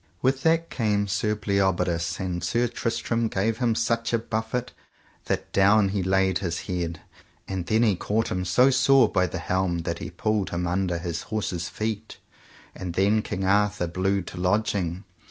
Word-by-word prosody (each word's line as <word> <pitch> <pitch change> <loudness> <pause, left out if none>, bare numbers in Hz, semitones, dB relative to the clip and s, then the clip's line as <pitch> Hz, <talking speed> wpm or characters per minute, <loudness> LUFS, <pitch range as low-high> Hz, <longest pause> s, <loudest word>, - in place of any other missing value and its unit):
With 135 +1 +2
that 165 +2 +2
came 105 -4 0
Sir 105 +2 0
Bleoberis, 95 -4 0
and 90 -3 -3
Sir 120 +7 +1
Tristram 115 0 -1
gave 110 +3 -1
him 120 -3 +2
such 115 0 0
a - - +4
buffet 110 +2 -3 0.5
that - - -2
down 100 +1 +5
he 100 0 -1
laid 95 0 +2
his 85 -3 -3
head; 85 -3 -3 0.5
and 95 -2 -4
then 110 +2 +3
he 105 -5 +3
caught 105 +5 -1
him 90 0 -1
so 125 +9 +4
sore 130 -1 +5
by 95 -3 +1
the - - -5
helm 90 -2 -1
that 85 0 -3
he - - -5
pulled 105 -3 -1
him 85 +1 -2
under 90 0 0
his 85 0 -4
horse's 95 -6 -2
feet. 110 0 -4 0.6
And 90 -2 -6
then 100 +3 +3
King 95 -2 -3
Arthur 100 -1 +2
blew 95 +3 0
to 90 - -9
lodging. 90 -1 0
100 Hz, 170 wpm, -25 LUFS, 90-110 Hz, 0.6 s, down